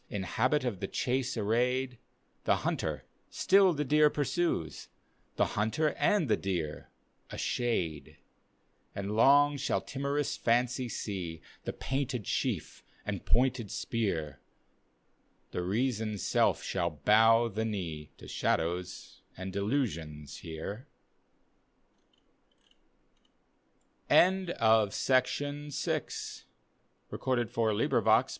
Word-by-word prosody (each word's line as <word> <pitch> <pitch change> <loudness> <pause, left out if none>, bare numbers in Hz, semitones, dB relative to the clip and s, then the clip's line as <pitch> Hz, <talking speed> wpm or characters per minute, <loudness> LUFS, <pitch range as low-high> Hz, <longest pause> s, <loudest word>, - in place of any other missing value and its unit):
In 100 -2 -3
habit 130 +10 +1
of 110 -7 -2
the 95 - -3
chase 125 +2 -1
arrayed, 125 +3 0 0.5
The - - +4
hunter - - -2 0.2
still 195 -1 +4
the 150 -2 -1
deer 150 +2 +5
pursues. 145 - -1 0.5
The - - +1
hunter 110 +9 +1
and 200 -8 +2
the 110 - +3
deer 85 -6 -3 0.2
— - - -42
a - - -7
shade) 90 -12 -2 0.8
And 100 +1 -3
long 145 +5 +5
shall 140 +1 0
timorous 140 +1 -2
Fancy 125 +1 +1
see 90 -7 -4 0.3
The - - -3
painted 130 -4 -2
chief - - -2 0.2
and - - -4
pointed 125 -3 +2
spear, 80 - -2 1.1
The - - -2
Reason's 110 +1 -1
self - - +2
shall 85 -2 -1
bow 110 +8 +4
the 110 0 -3
biee 85 -9 -4
To - - -12
shadows 90 +2 -2 0.2
and 95 0 -6
delusions 90 - -2
here. 85 +9 -7
115 Hz, 95 wpm, -31 LUFS, 95-130 Hz, 1.1 s, deer